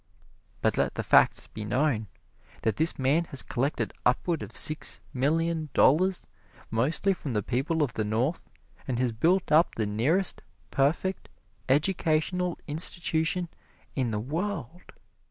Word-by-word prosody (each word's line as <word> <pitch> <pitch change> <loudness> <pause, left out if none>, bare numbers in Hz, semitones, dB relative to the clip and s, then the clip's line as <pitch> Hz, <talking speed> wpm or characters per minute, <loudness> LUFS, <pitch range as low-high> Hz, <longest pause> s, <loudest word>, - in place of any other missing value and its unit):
But - - +1
let - - 0
the - - -2
facts - - +4
be 110 - -8
known, 115 0 0 0.6
that 110 -2 0
this 160 +2 +2
man 140 +6 +2
has 135 -5 +1
collected 120 -3 -2
upward 160 +7 +1
of - - -6
six 155 0 +1
million 160 +4 0
dollars, 180 +7 +3 0.5
mostly 145 - +2
from 150 -7 -6
the 105 -2 0
people 135 - 0
of 130 - -2
the 110 - -1
North, 115 +10 -1 0.4
and 125 -3 -1
has 125 -1 +1
built 170 +12 +1
up 160 +3 +4
the 110 - -1
nearest 135 - 0 0.3
perfect 155 +7 0 0.4
educational 170 +3 +1
institution 165 +2 +1 0.5
in 130 -3 -1
the 105 -1 -2
world. 165 - -4
150 Hz, 135 wpm, -27 LUFS, 125-170 Hz, 0.6 s, facts